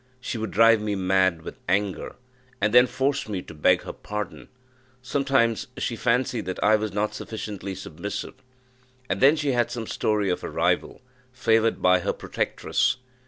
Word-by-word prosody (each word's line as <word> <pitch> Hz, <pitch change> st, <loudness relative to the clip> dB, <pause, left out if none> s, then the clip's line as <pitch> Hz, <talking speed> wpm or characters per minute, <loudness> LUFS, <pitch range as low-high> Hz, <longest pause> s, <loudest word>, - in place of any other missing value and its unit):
She 120 Hz, -2 st, -4 dB
would 110 Hz, -1 st, -3 dB
drive 115 Hz, +2 st, +5 dB
me 105 Hz, -1 st, -1 dB
mad 95 Hz, -3 st, +2 dB
with -, -, -9 dB
anger, 100 Hz, +1 st, -1 dB, 0.4 s
and 105 Hz, +2 st, +1 dB
then 125 Hz, +1 st, +7 dB
force 135 Hz, 0 st, -1 dB
me 95 Hz, -3 st, -3 dB
to -, -, -11 dB
beg 75 Hz, -, +3 dB
her -, -, -6 dB
pardon. 105 Hz, 0 st, -6 dB, 0.6 s
Sometimes 135 Hz, -4 st, +1 dB
she 120 Hz, -, -2 dB
fancied 120 Hz, -2 st, 0 dB
that 95 Hz, -, -3 dB
I 110 Hz, +1 st, +5 dB
was 110 Hz, -1 st, -2 dB
not 105 Hz, +1 st, -1 dB
sufficiently 100 Hz, -3 st, -6 dB
submissive, 95 Hz, +1 st, -6 dB, 0.8 s
and -, -, -1 dB
then 140 Hz, +4 st, +7 dB
she 150 Hz, -3 st, 0 dB
had 120 Hz, -2 st, +1 dB
some 115 Hz, -2 st, -4 dB
story 105 Hz, -3 st, 0 dB
of 90 Hz, -, -3 dB
a -, -, -4 dB
rival, -, -, 0 dB, 0.3 s
favoured 115 Hz, -3 st, +1 dB
by 90 Hz, 0 st, +5 dB
her -, -, -1 dB
protectress. 130 Hz, 0 st, -1 dB
110 Hz, 165 wpm, -25 LUFS, 95-125 Hz, 0.8 s, then